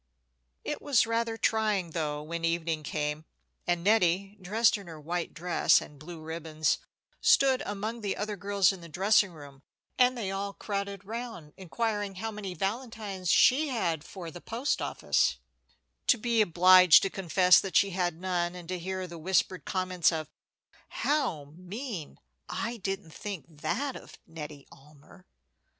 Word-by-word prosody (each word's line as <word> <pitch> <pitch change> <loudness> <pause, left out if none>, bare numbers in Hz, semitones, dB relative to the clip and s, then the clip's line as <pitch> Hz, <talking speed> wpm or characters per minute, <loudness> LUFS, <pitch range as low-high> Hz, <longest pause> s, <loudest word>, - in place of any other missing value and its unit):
It - - -4
was 275 -6 +3
rather 230 0 -1
trying, 210 -7 +1
though, 150 -2 -2
when 165 +2 -5
evening 165 -1 0
came, 150 0 -3 0.4
and 175 -1 +1
Nettie, 195 -1 +2
dressed 220 +5 +3
in 200 -3 -8
her 160 -2 -9
white 170 +3 -3
dress 175 +1 +3
and 145 -1 -12
blue 165 +2 -9
ribbons, 155 -1 -1 0.4
stood 265 -2 +4
among 215 +3 -4
the 200 -2 -2
other 210 0 -3
girls 200 -1 +2
in 185 - -10
the 170 - -11
dressing 195 +4 +3
room, 145 -4 -13 0.4
and 250 0 +4
they 200 -5 -3
all 200 +1 -3
crowded 200 -1 -4
round 225 -8 -7
inquiring 205 +1 -2
how 225 +4 -4
many 200 -4 -6
valentines 200 -2 -3
she 290 - +5
had 175 - -1
for 175 -3 -8
the 175 - -10
post 240 +5 -1
office, - - +1 0.7
to 250 - +5
be 230 0 +2
obliged 180 -2 +7
to 195 - -1
confess 185 -1 +5
that 195 - -5
she 200 - +4
had 175 -3 -1
none, 180 -1 -1
and 175 -2 -9
to 185 -1 -2
hear 185 +1 -4
the 170 -2 -9
whispered 185 +2 0
comments 185 -2 +1
of, 160 -2 -3 0.6
"How 160 - -1
mean!" 185 - -7 0.3
"I 235 +1 -3
didn't 195 -5 -4
think 200 -5 -6 0.2
that 275 - -1
of - - -11
Nettie 150 -3 -9
Almer." 135 - -18
185 Hz, 155 wpm, -29 LUFS, 165-210 Hz, 0.7 s, obliged